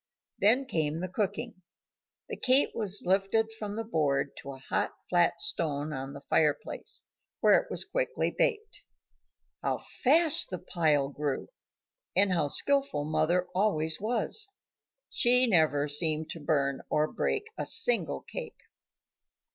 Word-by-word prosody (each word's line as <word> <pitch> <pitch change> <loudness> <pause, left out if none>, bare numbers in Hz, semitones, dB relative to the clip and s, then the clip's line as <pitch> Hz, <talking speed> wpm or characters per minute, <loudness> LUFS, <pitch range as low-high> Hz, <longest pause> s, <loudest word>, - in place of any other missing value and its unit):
Then 240 +7 +3
came 160 - -2
the 185 - -3
cooking. 205 +2 -4 0.7
The - - -5
cake 260 +2 +3
was 210 -3 0
lifted 195 +4 +1
from 210 -2 -6
the 225 - -3
board 145 -9 -1
to 140 - -8
a - - -11
hot 135 - -2
flat 175 -1 +2
stone 150 -3 0
on 135 0 -6
the 140 - -10
fireplace, 150 0 -1 0.4
where - - +5
it - - -9
was - - 0
quickly - - -2
baked. 440 -3 -1 0.8
How - - -1
fast 315 +4 +3
the 180 - -4
pile 155 -5 0
grew! 145 -1 -4 0.7
and 195 -1 +3
how 160 -4 +1
skilful 275 - +1
mother 170 +4 +1
always 160 -5 +1
was. 240 - -1 0.6
She 250 +1 +6
never 155 -8 +2
seemed 155 +1 +1
to 165 - -7
burn 140 -3 -1
or 150 0 +1
break 430 - -2
a - - -4
single - - +1
cake. 475 -3 -8
180 Hz, 140 wpm, -29 LUFS, 150-230 Hz, 0.8 s, She